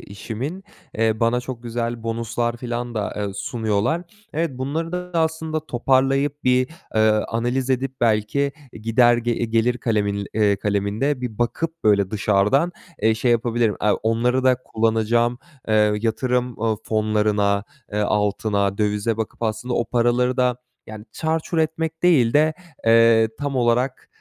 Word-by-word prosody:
işimin. 120 - -6 0.3
Eee, 110 0 +1
bana 115 +2 +2
çok 125 -1 -7
güzel 120 0 -3
bonuslar 115 +1 -2
filan 120 0 -4
da, 105 -2 -2
eee, 100 -1 -3
sunuyorlar. 110 - -1 0.3
Evet, 165 +1 0
bunları 160 +6 -3
da 180 0 -4
aslında 160 -1 -1
toparlayıp 135 +3 +1
bir, 125 0 +3 0.3
eee, 110 0 +4 0.2
analiz 125 +3 -1
edip, 130 0 -1
belki 115 +5 +1 0.2
gider, 120 +2 +3
eee, 120 0 -1
gelir 115 +2 +1
kalemin, 100 -3 -1
eee, 105 -2 +3
kaleminde 105 +8 -1
bir 115 -4 -5
bakıp 160 +7 -2
böyle 100 -2 +3
dışardan, 105 - +2 0.3
eee, 110 +1 +4
şey 120 +2 0
yapabilirim, 120 -2 +1
aaa, 105 0 +3
onları 120 +3 0
da 130 -1 +5
kullanacağım, 115 +2 +1 0.3
eee, 105 -1 +4
yatırım, 125 +1 -1
ııı, 110 -1 +1
fonlarına, 105 -2 +1 0.3
eee, 105 - -1
altına, 105 -1 0
dövize 105 +1 0
bakıp 110 +1 -5
aslında 115 +3 -2
o 120 - +1
paraları 125 +1 +1
da 125 -1 +2 0.3
yani 110 0 -9
çarçur 160 +1 -2
etmek 160 0 -1
değil 140 -10 +4
de, 155 +1 +3 0.3
eee, 115 -1 +5
tam 145 -2 -2
olarak, 125 +2 +1
120 Hz, 140 wpm, -22 LUFS, 110-130 Hz, 0.3 s, da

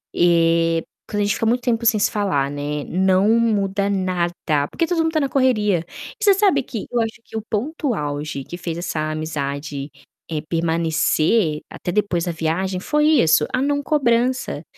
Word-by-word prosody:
eh, 165 -1 +3 0.3
quando 205 -1 -2
a - - +2
gente 205 0 +1
fica - - -2
muito 240 +2 +2
tempo 235 -2 0
sem 225 -2 +4
se 205 - +3
falar, 185 -10 0
né, 145 0 -4
não 190 +2 +2
muda 200 -3 +1
nada, 175 -6 -1
porque 330 - 0
todo 350 - -1
mundo 325 0 +2
está 320 -1 0
na 275 - 0
correria. 210 -11 +2 0.3
E - - -5
você 405 -1 +6
sabe 385 -9 +3
que 225 -3 -6
eu 245 - +1
acho 225 0 -4
que 225 - -8
o 220 - -4
ponto 275 +5 -2
auge 145 -4 -4
que 175 - -8
fez 170 -2 -4
essa 155 -3 -2
amizade, 145 -2 -4 0.4
eh, 155 -2 -2
permanecer, 165 +1 +1
até 175 - -5
depois 180 -3 0
da 175 - -1
viagem 170 +3 -2
foi 300 +9 +1 0.2
isso, 155 -1 +4
a 255 - +1
não 285 +1 0
cobrança. 245 - +1
185 Hz, 185 wpm, -21 LUFS, 160-235 Hz, 0.4 s, você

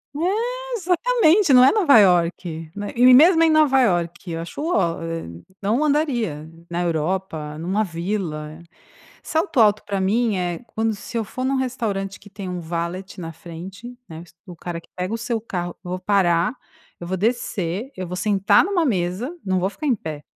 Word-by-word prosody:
É, 480 +9 -2
exatamente, 370 - +3
não 250 0 +8
é 265 - +7
Nova 325 - +6
Iorque, 170 -3 +1
né, 205 0 -5
e 250 +1 +7
mesmo 330 +5 +7
em 325 - +5
Nova 290 -4 +4
Iorque, 175 -4 0
eu 165 - -3
acho 170 - -7
o 330 +4 -1
ó, 170 -4 +1
éh, 165 0 -4 0.4
não 220 +8 +1
andaria, 240 - 0 0.2
na 175 +1 -1
Europa, 160 -2 -2
numa 190 +6 0
vila. 165 -4 -4 0.6
Salto 320 - 0
alto, 210 -1 +4
pra 200 -1 -2
mim, 215 +3 +1
é 175 0 -2
quando 220 0 0
se 230 +4 -8
eu 225 - 0
for 255 +5 -5
num 270 +1 +1
restaurante 220 -7 -2
que 205 - -16
tem 195 -2 -7
um 180 - -4
valet 170 +4 -5
na 165 -1 -6
frente, 185 +9 -10
né, 165 +1 -9 0.2
o 175 -2 -10
cara 170 0 -6
que - - -25
pega 180 +4 -3
o 230 - -3
seu 235 -1 -2
carro, 175 -5 -5
eu 175 - -6
vou 185 - -3
parar, 185 +1 +2 0.4
eu 175 - -8
vou 190 +1 -2
descer, 215 0 -2
eu 185 -1 -4
vou 180 +1 -5
sentar 195 0 +3
numa 360 -3 +1
mesa, 195 - -1
não 185 -1 0
vou 190 - +1
ficar 300 - -6
em 260 - +3
pé, 155 -7 -7
195 Hz, 190 wpm, -22 LUFS, 175-255 Hz, 0.6 s, não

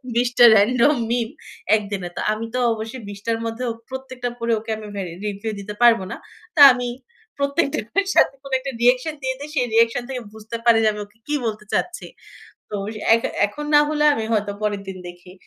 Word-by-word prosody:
২০ 245 +1 +2
টা 240 - +9
রান্ডম 245 +8 +4 0.2
মিম 235 -2 0 0.5
১ 215 - 0
দিনে। 185 -3 -3
তো - - -2
আমি 220 +1 -3
তো 255 - 0
অবশ্যই 225 +3 -6
২০ 200 0 -8
টার 230 -1 0
মধ্যে 230 +2 -4 0.3
প্রত্যেকটা 260 -2 -5
পড়ে 230 0 0
ওকে 225 +1 -12
আমি 215 - -9 0.2
এ - - -3 0.2
রিপ্লাই 205 +2 -4
দিতে 205 +1 -7
পারব 235 -2 +6
না। - - -4 0.4
তো - - -1
আমি 245 -1 -2 0.5
প্রত্যেকটার 280 - 0
সাথে - - +5
কোনো 275 - -8
একটা 270 +1 -5
রিঅ্যাকশন 250 +5 +3
দিয়ে 260 0 -1
দেই। 290 +2 -7
সে 270 - +1
রিঅ্যাকশন 230 +1 +3
থেকে 255 -2 -4
বুঝতে 220 +2 -7
পারে 235 -1 +6
যে - - +4
আমি 210 - -7
ওকে 205 +2 -28
কি 295 - 0
বলতে 215 -1 -4
চাচ্ছি। 360 - -2 0.7
তো - - -6 0.4
এখ 230 - +1 0.2
এখন 295 +9 -7
না 295 - +8
হলে 300 0 0
আমি 225 - -3
হয়তো 205 -1 0
পরের 205 -2 -1
দিন 190 -1 -6
দেখি। 175 +1 -13
230 Hz, 200 wpm, -21 LUFS, 215-260 Hz, 0.7 s, টা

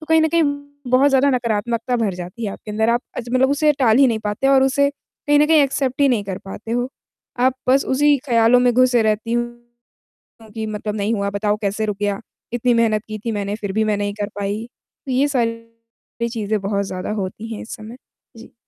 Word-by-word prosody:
तो 310 - -11
कहीं 320 0 +4
न 315 - +3
कहीं 335 +1 +2 0.5
बहुत 265 +3 +5
ज़्यादा 270 +1 +4
नकारात्मकता 235 0 -1
भर 210 -5 0
जाती 180 +6 -7
है 200 - -2
आपके 210 - -10
अंदर। 220 +2 +1
आप 240 - +2 0.2
अज 240 -1 -5
मतलब 265 +1 +3
उसे 300 +1 +3
टाल 225 -3 +4
ही 275 - +7
नहीं 225 -3 0
पाते 210 +6 -1
और 270 -1 +5
उसे 280 +1 +3
कहीं 290 0 -2
न 300 - +5
कहीं 315 -1 +5
एक्सेप्ट 270 -1 -1
ही 280 - +5
नहीं 220 -5 +1
कर 190 -1 -5
पाते 205 +3 -8
हो, 245 +2 0 0.5
आप 260 +1 +3
बस 270 +2 +4
उसी 290 +2 +3
ख़्याल 230 0 +4
में 245 - +4
घुसे 245 -1 +4
रहती 220 +2 0
हूँ 240 0 -6 0.6
कि, 220 -1 -4
मतलब 210 0 -4
नहीं 210 +2 0
हुआ, 200 -1 -1
बताओ 205 +1 -1
कैसे 210 +1 -1
रुक 210 -2 -3
गया? 205 -1 -1 0.3
इतनी 245 0 +2
मेहनत 220 -2 +2
की 215 -1 -6
थी 230 - 0
मैंने, 205 -1 -2
फिर 205 -3 -4
भी 220 +1 +2
मैं 215 -1 0
नहीं 205 0 -2
कर 205 - -2
पाई। 205 +3 -3 0.4
तो 265 - -4
ये 270 +3 +3
सारी 230 -2 -4
चीज़ें 215 -2 -2
बहुत 200 0 -1
ज़्यादा 185 +2 -4
होती 215 +4 -6
हैं 215 - -7
इस 225 - -7
समय। 220 +3 -10 0.4
जी। 230 - -13
230 Hz, 220 wpm, -20 LUFS, 210-255 Hz, 0.6 s, ही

